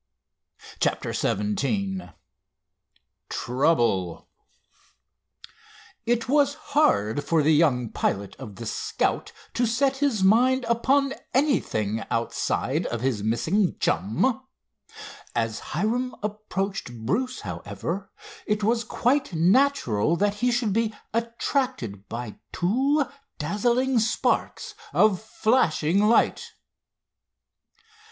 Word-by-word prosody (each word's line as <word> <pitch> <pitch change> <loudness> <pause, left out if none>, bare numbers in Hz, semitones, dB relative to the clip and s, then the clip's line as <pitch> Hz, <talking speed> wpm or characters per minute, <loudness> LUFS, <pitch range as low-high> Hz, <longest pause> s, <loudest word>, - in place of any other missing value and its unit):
CHAPTER - - 0
XVII 180 - -1 1.2
TROUBLE 120 - 0 1.8
It 235 -1 +1
was 285 +1 +3
hard 145 - +1
for 160 -2 +2
the 155 +2 +4
young 135 -7 +2
pilot 100 0 -2
of 115 -7 -9
the 115 - -8
Scout - - -1 0.2
to 240 0 +1
set 270 +4 +1
his 270 -8 +1
mind 250 +6 +4
upon 270 +4 +2 0.2
anything 110 - +1
outside 115 0 -1
of 120 -1 -3
his 125 -5 0
missing 160 - +1
chum. 115 - +1 0.9
As 115 -1 -1
Hiram 230 +10 -2
approached 195 - -4
Bruce, 250 - -1
however, 100 - -5 0.4
it 210 0 0
was 230 +2 +2
quite 255 +1 0
natural 170 - +3
that 205 +3 +1
he 245 +4 0
should 235 -4 0
be 225 0 0 0.2
attracted 230 - -2
by 115 -2 -6
two 270 - +1 0.3
dazzling 235 - +1
sparks 220 0 0 0.2
of 210 -4 +4
flashing 200 -6 +2
light. 215 +3 +2
205 Hz, 95 wpm, -25 LUFS, -, 1.8 s, the